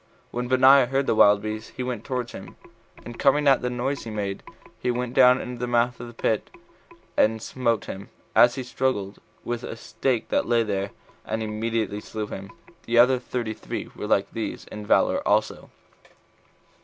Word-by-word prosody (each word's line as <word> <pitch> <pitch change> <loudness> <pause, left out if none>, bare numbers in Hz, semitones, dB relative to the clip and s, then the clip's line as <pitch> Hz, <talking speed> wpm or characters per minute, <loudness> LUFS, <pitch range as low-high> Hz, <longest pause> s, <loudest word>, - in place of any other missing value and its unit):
When 120 0 -3
Benaiah 130 +1 +6
heard 135 +2 0
the - - +2
wild 105 -1 +5
beast, 110 0 -5
he 130 - -2
went 125 -3 -4
towards 125 -2 -3
him, - - -10 0.5
and 120 -1 -9
coming 145 +1 +3
at 135 -2 +5
the 125 - -1
noise 125 +3 -2
he 115 - -7
made, 100 -2 -3 0.4
he - - -2
went 125 0 -2
down 125 0 +6
into 125 -1 -6
the 125 - -2
mouth 120 0 +1
of 120 - -7
the 120 - -11
pit 110 -2 -1 0.7
and 110 +1 +3
smote 115 -1 -1
him, 95 +1 -8 0.2
as 120 +1 +6
he 130 - -4
struggled, 125 -6 -2 0.2
with 120 -1 -3
a - - -5
stake 120 +1 -2
that - - +1
lay 120 -1 +3
there, 100 -2 -2 0.3
and 110 +1 -3
immediately 110 -1 -2
slew 110 0 -5
him. 100 -1 -8 0.4
The 120 +1 +1
other 125 +2 +6
thirty 120 -3 -3
three - - -6
were - - -5
like - - +1
these - - -5
in 105 -1 -7
valor - - +3
also. - - 0
120 Hz, 185 wpm, -25 LUFS, 110-125 Hz, 0.7 s, Benaiah